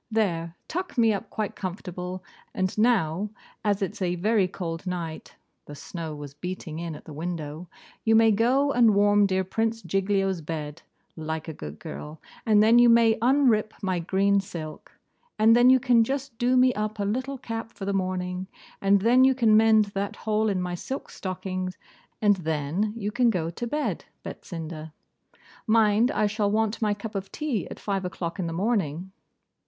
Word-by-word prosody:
There, 175 Hz, -7 st, -1 dB
tuck 355 Hz, -3 st, -4 dB
me 225 Hz, -2 st, +4 dB
up 200 Hz, +1 st, -5 dB
quite 215 Hz, -2 st, -3 dB
comfortable; 180 Hz, -1 st, -6 dB, 0.3 s
and 185 Hz, 0 st, -1 dB
now, 210 Hz, -4 st, +2 dB, 0.3 s
as 205 Hz, -1 st, +1 dB
it's 200 Hz, +2 st, -5 dB
a 180 Hz, -1 st, 0 dB
very 200 Hz, +2 st, +2 dB
cold 175 Hz, -1 st, -5 dB
night 170 Hz, -3 st, -5 dB, 0.3 s
(the 145 Hz, -, -8 dB
snow 160 Hz, 0 st, -6 dB
was 145 Hz, -1 st, -8 dB
beating 170 Hz, 0 st, -6 dB
in 170 Hz, -2 st, -5 dB
at -, -, -12 dB
the 155 Hz, -, -9 dB
window), 160 Hz, +1 st, -5 dB, 0.3 s
you 225 Hz, 0 st, +4 dB
may 225 Hz, 0 st, +6 dB
go 255 Hz, +7 st, +2 dB
and 235 Hz, -5 st, +4 dB
warm 205 Hz, 0 st, +4 dB
dear 190 Hz, 0 st, +1 dB
Prince 225 Hz, +4 st, -2 dB
Giglio's 195 Hz, 0 st, 0 dB
bed, 150 Hz, -1 st, -5 dB, 0.3 s
like 160 Hz, 0 st, -4 dB
a 160 Hz, -, -5 dB
good 75 Hz, -, -8 dB
girl, 155 Hz, 0 st, -8 dB, 0.3 s
and 210 Hz, -1 st, +5 dB
then 230 Hz, +2 st, +6 dB
you 240 Hz, 0 st, +7 dB
may 230 Hz, -1 st, +6 dB
unrip 240 Hz, -4 st, +3 dB
my 185 Hz, -2 st, 0 dB
green 195 Hz, +3 st, +2 dB
silk, 165 Hz, -5 st, -7 dB, 0.5 s
and 220 Hz, +1 st, +6 dB
then 245 Hz, +1 st, +6 dB
you 260 Hz, 0 st, +6 dB
can 240 Hz, -2 st, +4 dB
just 270 Hz, 0 st, -3 dB
do 250 Hz, +1 st, +3 dB
me 255 Hz, 0 st, +5 dB
up 215 Hz, 0 st, -3 dB
a 200 Hz, -, -1 dB
little 260 Hz, +6 st, -2 dB
cap 225 Hz, -2 st, -6 dB
for 195 Hz, -, -8 dB
the 200 Hz, -, -1 dB
morning, 185 Hz, -1 st, -2 dB, 0.3 s
and 195 Hz, 0 st, +4 dB
then 245 Hz, +4 st, +5 dB
you 265 Hz, 0 st, +5 dB
can 225 Hz, -4 st, +4 dB
mend 220 Hz, -1 st, +5 dB
that 200 Hz, +1 st, -3 dB
hole 215 Hz, 0 st, 0 dB
in 195 Hz, -2 st, 0 dB
my 180 Hz, -1 st, -3 dB
silk 265 Hz, +10 st, -5 dB
stocking, 185 Hz, -1 st, -4 dB, 0.5 s
and 205 Hz, -2 st, +5 dB
then 160 Hz, +5 st, -1 dB
you 210 Hz, -2 st, -3 dB
can 240 Hz, +1 st, +3 dB
go 170 Hz, -6 st, -1 dB
to 235 Hz, +7 st, -5 dB
bed, 295 Hz, +4 st, -2 dB, 0.2 s
Betsinda. 160 Hz, -2 st, -7 dB, 0.7 s
Mind 220 Hz, +1 st, +4 dB
I 215 Hz, -, +1 dB
shall 205 Hz, 0 st, 0 dB
want 220 Hz, +1 st, 0 dB
my 210 Hz, -2 st, +1 dB
cup 210 Hz, +2 st, -7 dB
of 195 Hz, -1 st, -5 dB
tea 275 Hz, -, -2 dB
at -, -, -9 dB
five 195 Hz, -2 st, -2 dB
o'clock 180 Hz, -1 st, -5 dB
in 175 Hz, -, -1 dB
the -, -, -3 dB
morning. 190 Hz, -3 st, -1 dB
200 Hz, 180 wpm, -26 LUFS, 175-225 Hz, 0.7 s, you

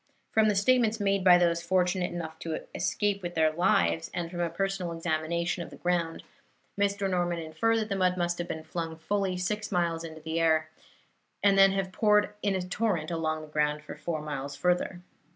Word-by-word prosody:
From 220 Hz, -1 st, +4 dB
the 210 Hz, -, +2 dB
statements 225 Hz, +1 st, +3 dB
made 195 Hz, -1 st, +1 dB
by 180 Hz, -1 st, +8 dB
those 170 Hz, -1 st, +2 dB
fortunate 180 Hz, +1 st, +1 dB
enough 160 Hz, -2 st, -6 dB
to 160 Hz, -1 st, -4 dB
escape 205 Hz, -1 st, 0 dB
with 175 Hz, -1 st, -5 dB
their 160 Hz, -1 st, +3 dB
lives, 85 Hz, -, +2 dB
and 170 Hz, -1 st, -3 dB
from 175 Hz, -, -6 dB
a 170 Hz, -1 st, 0 dB
personal 185 Hz, 0 st, -2 dB
examination 170 Hz, +1 st, -1 dB
of 170 Hz, -, -6 dB
the -, -, -11 dB
ground, 170 Hz, -2 st, -1 dB, 0.5 s
Mr. 200 Hz, 0 st, 0 dB
Norman 175 Hz, -2 st, 0 dB
inferred 165 Hz, +8 st, 0 dB
that 220 Hz, -1 st, -2 dB
the 195 Hz, -, 0 dB
mud 185 Hz, -1 st, +2 dB
must 175 Hz, 0 st, -1 dB
have 175 Hz, -, -3 dB
been 160 Hz, -2 st, -5 dB
flung 165 Hz, -1 st, -4 dB
fully 190 Hz, +2 st, -1 dB
six 210 Hz, +4 st, -2 dB
miles 170 Hz, -3 st, 0 dB
through 160 Hz, -1 st, -8 dB
the 160 Hz, +1 st, -1 dB
air 160 Hz, -1 st, +2 dB, 0.7 s
and 200 Hz, -1 st, +5 dB
then 195 Hz, 0 st, +6 dB
have 195 Hz, -1 st, -2 dB
poured 210 Hz, +1 st, +3 dB
in 200 Hz, -1 st, +1 dB
a 190 Hz, -, -1 dB
torrent 180 Hz, -4 st, -1 dB
along 155 Hz, -1 st, -1 dB
the -, -, -10 dB
ground 150 Hz, 0 st, 0 dB
for 150 Hz, -, -8 dB
four 155 Hz, 0 st, -4 dB
miles 140 Hz, -1 st, -5 dB
further. 180 Hz, +3 st, 0 dB
175 Hz, 200 wpm, -28 LUFS, 160-195 Hz, 0.7 s, by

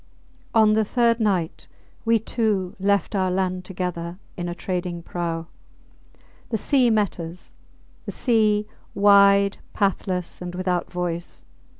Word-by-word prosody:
On 215 Hz, -1 st, +6 dB
the 220 Hz, 0 st, +3 dB
third 235 Hz, +1 st, +2 dB
night 190 Hz, -7 st, -1 dB, 0.4 s
we 230 Hz, 0 st, +4 dB
two 215 Hz, -4 st, -1 dB
left 200 Hz, +2 st, +1 dB
our 190 Hz, -2 st, +1 dB
land 185 Hz, 0 st, -1 dB
together 180 Hz, -2 st, -4 dB, 0.2 s
in 175 Hz, -2 st, -4 dB
a 175 Hz, -, -4 dB
trading 175 Hz, -1 st, -3 dB
prau. 170 Hz, -1 st, -3 dB, 1.0 s
The 225 Hz, -, 0 dB
sea 255 Hz, +2 st, +3 dB
met 210 Hz, -4 st, +1 dB
us 170 Hz, +2 st, -8 dB, 0.5 s
the -, -, -2 dB
sea, 215 Hz, -4 st, +2 dB, 0.3 s
wide, 200 Hz, 0 st, +5 dB, 0.2 s
pathless, 185 Hz, -3 st, -1 dB
and 180 Hz, 0 st, -6 dB
without 180 Hz, -1 st, -1 dB
voice. 175 Hz, -1 st, -4 dB
190 Hz, 125 wpm, -23 LUFS, 180-210 Hz, 1.0 s, On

